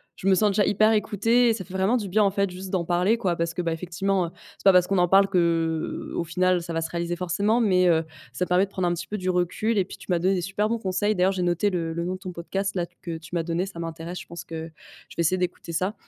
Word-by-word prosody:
je - - -10
me 195 - +6
sens 210 +2 +3
déjà 200 0 +2
hyper 215 +2 +3
écoutée 225 +3 +2
et - - +3
ça 215 -4 -5
fait 185 +1 -10
vraiment 190 +6 +2
du 205 -4 -4
bien, 210 +3 +3
en 195 - +3
fait, 200 0 0
juste 185 +1 -8
d'en 180 -3 0
parler 180 +6 +2
quoi. 180 -6 0
Parce 165 0 -2
que, 180 - -2
bah, 165 -1 -1
effectivement, 180 +3 -1
heu, - - -7 0.3
c'est - - -19
pas 195 - +7
parce 180 0 +5
qu'on 195 - +1
en 175 0 +4
parle, 195 +2 +5
qu'au 165 -3 0
final 180 +1 +1
ça 170 -1 -5
va 165 - -1
se 160 - -3
réaliser 170 0 -2
forcément. 200 +6 +1
Mais, 185 -4 +3
heu, 165 -1 +3 0.3
ça 180 +7 -2
permet 180 +2 +3
de 195 - -20
prendre 185 -2 -1
un 175 - +1
petit 170 0 -5
peu 210 - -3
du 185 0 -2
recul 185 +5 0
et 190 - +2
puis - - -10
tu - - -14
m'as 175 - +3
donné 185 +3 +2
des 180 - 0
super 205 +4 -1
bons 230 0 -1
conseils, 195 +1 0
d'ailleurs 190 0 +2
j'ai 180 -1 -2
noté 175 +4 +1
le 165 -3 -2
le 170 - -2
nom 180 +2 -2
de 185 - -10
ton 185 -2 -6
podcast 195 +3 -3
là 175 -2 -2 0.2
que 165 -2 -4
tu 160 +2 -9
m'as 165 - 0
donné, 170 +3 -1
ça 190 - -10
m'intéresse, 165 +1 -5
je - - -9
pense 170 0 -8
que 160 -1 -7 0.4
je - - -13
vais - - +1
essayer 185 +3 +2
d'écouter 180 -1 -3
ça. 185 +5 -1
180 Hz, 300 wpm, -25 LUFS, 170-195 Hz, 0.4 s, pas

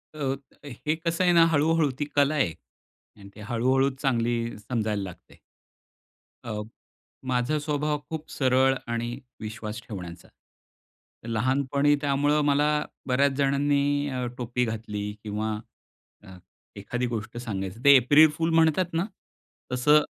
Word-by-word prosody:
अ, 135 -3 -1 0.3
हे 145 +3 -3
कसं 165 +2 -1
आहे 180 - +4
ना 165 -1 +7
हळू-हळू 155 0 +3
ती 145 - 0
कला 145 +1 +4
आहे 130 - +1 0.7
आणि 100 0 -12
ते 105 - -11
हळू-हळू 130 +5 +2
चांगली 120 -3 +1 0.3
समजायला 110 -4 -1
लागते. 95 -3 -11 1.1
अ, 105 -3 -4 0.7
माझा 125 +4 +1
स्वभाव 150 0 -1
खूप 160 -1 -5
सरळ 130 0 +3 0.2
आणि 120 +2 -3 0.2
विश्वास 110 0 -6
ठेवण्याचा. 90 -4 -8 1.0
लहानपणी 135 +5 +2
त्यामुळे 145 +1 +2
मला 145 +1 +3 0.4
बऱ्याच 140 +2 +3
जणांनी 145 +1 +1
अ, 130 -2 -2
टोपी 125 0 -1
घातली 105 -2 -4
किंवा 110 +1 -2 0.7
अ, 95 -2 -12 0.4
एखादी 120 +5 -3
गोष्ट 115 -1 -5
सांगायची 100 -4 -4
ते 140 0 +9
एप्रिल 145 +5 +6
फुल 165 0 0
म्हणतात 165 +2 +3
ना 165 +3 +1 0.7
तसं 150 +4 +5
130 Hz, 125 wpm, -26 LUFS, 115-145 Hz, 1.1 s, ते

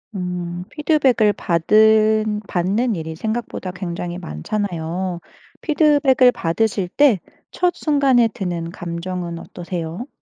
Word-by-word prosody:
음. 180 -1 -4
피드백을 275 -8 +2
받은 215 +4 +3
받는 205 +7 0
일이 160 -1 -5
생각보다 220 -1 -4
굉장히 175 -1 -5
많잖아요. 175 - -3 0.4
피드백을 290 -5 +4
받으실 195 +1 -1
때 260 -2 +4 0.4
첫 360 -1 +1
순간에 275 -6 +3
드는 175 -5 -4
감정은 175 0 -5
어떠세요? 175 - -6
195 Hz, 255 characters per minute, -20 LUFS, 175-235 Hz, 0.4 s, 피드백을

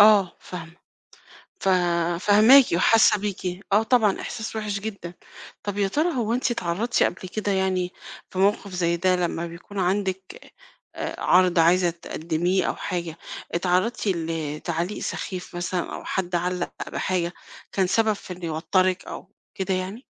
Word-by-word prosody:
آه 205 -3 +6
فاهمة. 170 -1 -9 0.8
ف - - 0 0.5
فاهماكِ 220 +7 +8
وحاسة 220 +3 +5
بيكِ، 190 -3 -3
آه 210 +2 +5
طبعًا، 225 -4 +2
إحساس 220 -1 -5
وِحِش 210 -2 -2
جدًا. 195 -5 -6 0.5
طَب 205 0 -4
يا 200 - +2
ترى 310 - 0
هو 230 -2 0
أنتِ 250 +1 0
اتعرَّضتِ 225 +2 0
قبل 185 - -1
كده 205 +1 -2
يعني 185 -1 0 0.4
في 185 - -6
موقف 200 0 +2
زي 170 -1 +1
ده 185 +1 +2
لمّا 170 -1 -1
بيكون 170 +4 -9
عندِك 190 0 -2 0.4
آآ - - -5
عَرْض 180 -1 +4
عايزة 175 +2 +4
تقدِّميه 170 +2 -1
أو - - -1
حاجة، 170 -2 -4 0.3
اتعرَّضتِ 185 +7 0
لتعليق 165 +1 -2
سخيف 180 -2 -5
مثلًا 175 0 -2
أو - - -7
حد 180 -2 -2
علَّق 180 +1 -1 0.2
بحاجة 175 -2 -1 0.4
كان 190 -1 +2
سبب 220 +4 +2
في 200 -2 -8
إن 180 0 -11
يوتَّرِك 180 +3 +1
أو - - -8 0.3
كده 190 -2 -1
يعني؟ 190 +7 -4
185 Hz, 145 wpm, -24 LUFS, 175-205 Hz, 0.8 s, فاهماكِ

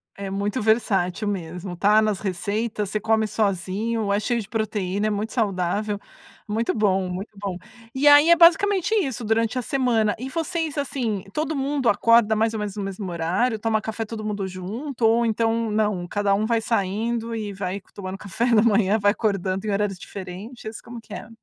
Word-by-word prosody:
é 195 -1 -5
muito 200 +5 -2
versátil 210 -3 +1
mesmo. 180 -1 -4
Tá 210 +4 +4
nas 215 -3 0
receitas, 205 +2 -2
você 215 - -1
come 220 0 +1
sozinho, 205 +2 -1
é 205 - +2
cheio 235 +2 0
de 210 - -6
proteína, 210 -2 -1
é - - +1
muito 210 +1 -3
saudável, 205 -1 -1 0.5
muito 220 +2 0
bom, 190 -4 +1
muito 190 +5 -5
bom. 190 -3 -3 0.4
E 285 +2 +2
aí, 290 +3 +8
é 340 - +8
basicamente 375 +4 +4
isso 270 - -1
durante 225 +2 +1
a - - +1
semana. 235 -5 +1
E 260 +1 -5
vocês, 325 -1 -2
assim, 240 -8 -2
todo 310 0 -1
mundo 275 -2 0
acorda 220 +1 +4
mais 225 +1 +1
ou 220 - -3
menos 210 -1 -4
no 205 - -3
mesmo 195 -1 -5
horário, 180 +8 0
toma 220 -1 0
café 220 0 -4
todo 215 0 -6
mundo 205 -2 -3
junto 225 +8 -4
ou 230 +1 +4
então, 225 0 +1
não, 210 -5 0
cada 205 +1 +1
um 215 +2 0
vai 230 0 +1
saindo 225 +2 -1
e 210 -2 -4
vai 190 +1 -4
tomando 190 -1 -6
café 200 +5 -2
da 215 - +6
manhã, 215 -1 +3
vai 205 0 +4
acordando 195 -2 -1
em 210 - -1
horários 200 -1 0
diferentes, 205 +6 -8
como 235 -1 -10
que 215 - -12
é? 215 - -7
215 Hz, 190 wpm, -23 LUFS, 200-230 Hz, 0.5 s, aí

